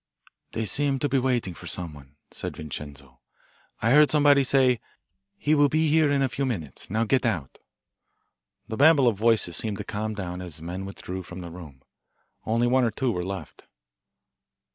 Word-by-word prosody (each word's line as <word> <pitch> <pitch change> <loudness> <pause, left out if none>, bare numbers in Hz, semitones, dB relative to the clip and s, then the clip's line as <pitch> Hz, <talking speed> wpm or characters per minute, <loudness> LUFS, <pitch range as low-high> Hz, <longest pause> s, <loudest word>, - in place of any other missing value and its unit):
"They 110 - -2
seem 140 +6 +1
to 145 - 0
be 135 0 +2
waiting 125 -7 0
for - - -11
someone," 75 -5 -7 0.2
said - - -6
Vincenzo. 70 -4 -8 0.6
"I 115 - +3
heard 150 +2 +7
somebody 145 -2 +5
say: 130 -2 +3 0.6
'He 155 -7 +1
will 145 -1 +5
be 155 +1 +2
here 155 -1 +4
in 140 -1 +2
a - - +3
few 135 +3 -3
minutes. 90 - -4
Now 110 +4 +1
get 130 +3 +2
out.'" 85 - -2 1.1
The 110 - -5
babel 145 -2 +6
of 115 - +3
voices 110 -6 +2
seemed 105 -3 -3
to - - -5
calm 110 +1 -4
down 90 -3 -5
as 85 -4 -7
men 90 +4 -5
withdrew 95 -1 -6
from 90 +1 -9
the 85 -1 -8
room. 80 -7 -12 0.6
Only 115 +2 +2
one 130 +1 +3
or 120 - +3
two 125 +3 -1
were 90 -4 -2
left. 95 +1 -7
110 Hz, 180 wpm, -26 LUFS, 90-135 Hz, 1.1 s, heard